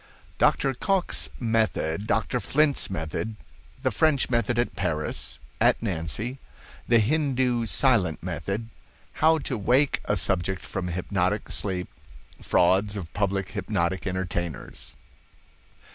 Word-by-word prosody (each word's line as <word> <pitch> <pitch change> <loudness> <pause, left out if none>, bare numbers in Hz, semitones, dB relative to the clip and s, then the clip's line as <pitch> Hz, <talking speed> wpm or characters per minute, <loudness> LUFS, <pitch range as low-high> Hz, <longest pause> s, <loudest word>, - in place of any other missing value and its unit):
Dr. 135 - +3
Cocke's 190 - +1
Method—Dr. 110 0 0
Flint's 145 +2 +2
Method—The 95 +5 -5
French 150 -5 +2
Method 120 0 +1
at 120 - 0
Paris—at 75 -8 -1
Nancy—The 115 - -3
Hindoo 125 -1 +1
Silent 100 - +3
Method—How 105 - -2
to 130 -6 -3
Wake 130 +7 +3
a 105 - +1
Subject 95 0 +1
from 90 - -4
Hypnotic 90 +3 -1
Sleep—Frauds 95 - -1
of 85 -4 -7
Public 100 -1 -1
Hypnotic 95 -2 -1
Entertainers. 90 -4 -4
105 Hz, 90 wpm, -26 LUFS, 90-120 Hz, -, Dr